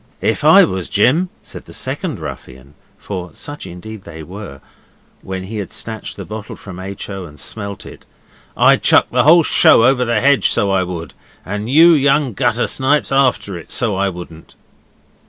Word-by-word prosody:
'If - - -1
I - - +7
was 95 -1 -2
Jim,' 125 - +2
said - - -11
the - - -13
second - - -3
ruffian, 65 +2 -10 0.2
for 90 -4 -7
such 145 +1 -7
indeed 95 +4 -10
they 80 -1 -10
were, 90 -5 -9 0.6
when 95 -1 -6
he 105 +4 -7
had 100 -4 -5
snatched 110 -1 -5
the - - -7
bottle 110 0 -8
from 90 -3 -11
H. 95 +1 -7
O. 95 -2 -6
and 75 -3 -14
smelt 100 +6 -4
it, - - -13 0.5
'I'd - - +4
chuck - - +4
the - - +2
whole 165 +2 +7
show 115 - +5
over 130 -1 +3
the 115 -2 0
hedge, 140 +3 +3
so 100 - +1
I 95 -1 +2
would, 90 -2 -6 0.3
and 105 +3 -4
you 165 +5 +7
young 140 -3 +2
gutter 120 0 0
snipes 140 +3 0
after 130 -7 +1
it, 80 - -14
so 110 -5 0
I 100 +1 0
wouldn't. 85 -3 -11
105 Hz, 180 wpm, -17 LUFS, 95-125 Hz, 0.6 s, I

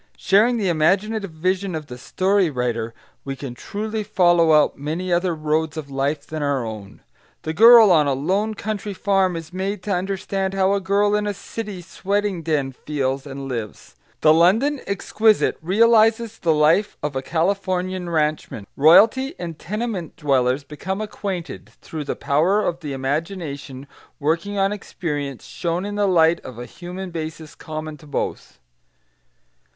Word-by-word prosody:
Sharing 225 +5 +3
the 205 -4 -1
imaginative 195 +6 +1
vision 185 +3 -1
of 155 -1 -5
the 125 - -9
story 190 +5 +1
writer, 120 -4 -2 0.3
we 135 0 -5
can 135 -2 -7
truly 215 - -4
follow 175 -5 +3
out 150 -1 +4
many 165 +6 -3
other 175 0 +1
roads 155 +1 -1
of 145 -3 -6
life 140 +2 -1
than 155 0 -5
our 140 -4 0
own. 110 -3 -8 0.4
The 160 - -3
girl 225 +1 +8
on 155 -4 +4
a 140 - +2
lone 195 +10 -1
country 205 -1 -4
farm 195 -2 +1
is 165 +1 -7
made 190 +1 -3
to 210 - -3
understand 190 +1 -2
how 195 0 +2
a 200 - 0
girl 200 +2 +2
in 210 0 +1
a 205 - -2
city 200 -2 -7
sweating 200 0 -2
den 150 -4 -1
feels 135 0 -3
and 135 0 -7
lives; 115 -5 -6 0.3
the 155 - +6
London 225 - +3
exquisite 215 +2 +2
realises 225 +4 +3
the 165 - +2
life 155 +7 +3
of 150 -2 -2
a 130 - -1
Californian 185 +2 -1
ranchman; 155 -9 -1
royalty 225 - +5
and 165 -3 -6
tenement 210 -3 -4
dwellers 135 -2 +1
become 180 +7 -5
acquainted, 195 -5 -5
through 155 -2 -7
the - - -3
power 175 +9 +1
of 170 - -2
the 150 -4 -6
imagination 140 -1 -4 0.3
working 165 +7 -1
on 195 0 +2
experience 145 - -5
shown 170 +2 -3
in 205 - -4
the 205 0 +1
light 170 -2 +4
of 125 -3 -10
a 120 - -6
human 180 +5 -8
basis 160 -1 -6
common 155 -1 -7
to 150 - -16
both. 145 - -4
175 Hz, 160 wpm, -22 LUFS, 150-200 Hz, 0.4 s, girl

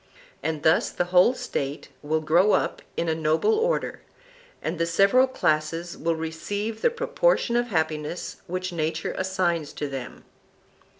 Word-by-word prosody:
And 160 -2 -3
thus 160 - +4
the 175 - -1
whole 185 +8 +6
State 140 - -4
will 155 +1 0
grow 170 +7 +4
up - - 0 0.2
in 170 - 0
a 160 - +2
noble 160 - +2
order, 465 +3 0 0.6
and 160 +2 -4
the 170 - +1
several 200 +10 +4
classes 165 -6 -1
will 165 0 -1
receive 200 +7 -4
the - - +4
proportion 475 - +1
of 240 0 +2
happiness 160 -3 -2
which 185 +1 -3
nature 155 -1 -2
assigns 180 -5 -1
to 145 - -3
them. 135 -3 -7
170 Hz, 145 wpm, -25 LUFS, 155-200 Hz, 0.6 s, whole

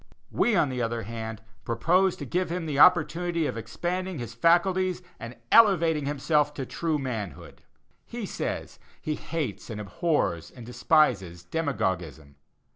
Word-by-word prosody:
We, 240 - +2
on 160 -6 +3
the 125 -1 -3
other 115 0 -2
hand, 110 0 -6 0.2
propose 175 - +2
to 145 - -7
give 180 +7 -1
him 175 0 -3
the 145 -3 -2
opportunity 170 0 +4
of - - -2
expanding 175 - -3
his 120 -3 -6
faculties 180 +6 +2 0.2
and 115 +2 -8
elevating 170 -9 +5
himself 150 +1 +1
to 135 - -4
true 160 +3 -1
manhood. 110 - -6 0.5
He - - -5
says - - -5 0.2
he 155 - -3
"hates 150 - -4
and 110 -2 -5
abhors 95 - -1
and 120 -3 -12
despises 100 - +1
demagogism." 90 - -3
145 Hz, 140 wpm, -27 LUFS, 115-170 Hz, 0.5 s, elevating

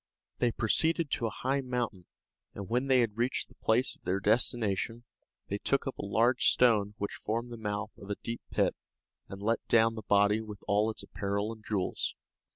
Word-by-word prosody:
They 120 -1 +3
proceeded 160 +8 +2
to 115 - 0
a 105 - -7
high 135 +1 +2
mountain, 120 -8 -3 0.5
and 100 -1 -6
when 125 +4 0
they 130 -2 +5
had 115 -1 -1
reached 125 +3 0
the - - -18
place 120 +4 +2
of - - -30
their 95 +2 0
destination, 115 +1 +1 0.4
they 100 - -3
took 140 - +1
up 135 - -5
a - - -3
large 115 +5 +3
stone 105 -4 +4
which 100 -1 -3
formed 115 +3 -3
the 120 - -6
mouth 105 -1 -4
of 100 - -11
a 100 - -1
deep 115 +3 -5
pit, - - +1 0.5
and 95 +1 -8
let 115 +2 +1
down 115 0 +4
the 110 - -6
body 105 +1 +3
with 105 -2 -9
all 105 +2 +3
its 110 - -6
apparel 100 +2 -2
and 110 -1 -15
jewels. 100 -4 -2
110 Hz, 195 wpm, -30 LUFS, 100-120 Hz, 0.5 s, they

